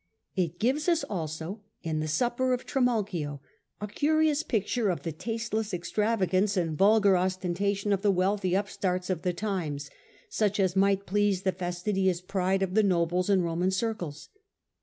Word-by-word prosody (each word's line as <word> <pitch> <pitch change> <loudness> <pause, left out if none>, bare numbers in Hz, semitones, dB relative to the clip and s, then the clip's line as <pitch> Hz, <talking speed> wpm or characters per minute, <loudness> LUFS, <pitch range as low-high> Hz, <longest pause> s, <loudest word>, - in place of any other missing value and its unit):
It 175 -3 -1
gives 275 +9 +1
us 335 -1 +2
also, 165 +2 -4 0.2
in 160 -2 -1
the 155 - -2
supper 245 +10 +1
of 250 - -3
Trimalchio, 205 - 0 0.4
a 210 - -3
curious 305 +6 +2
picture 220 -4 0
of 175 - -2
the 165 - -2
tasteless 220 +3 -3
extravagance 195 +1 +1
and 165 -3 0
vulgar 205 +2 +5
ostentation 190 +2 0
of 195 - 0
the 205 - +2
wealthy 190 0 +1
upstarts 185 -2 -1
of 175 -3 -2
the 180 - 0
times, 170 -8 -3 0.4
such 205 -2 0
as 190 -2 +2
might 195 0 +2
please 200 -1 +1
the 190 - +2
fastidious 185 +1 -1
pride 190 +1 0
of 185 -1 -2
the 220 - +5
nobles 180 -1 +1
in 190 -3 +4
Roman 170 +2 0
circles. 190 -7 -3
190 Hz, 160 wpm, -28 LUFS, 175-210 Hz, 0.4 s, vulgar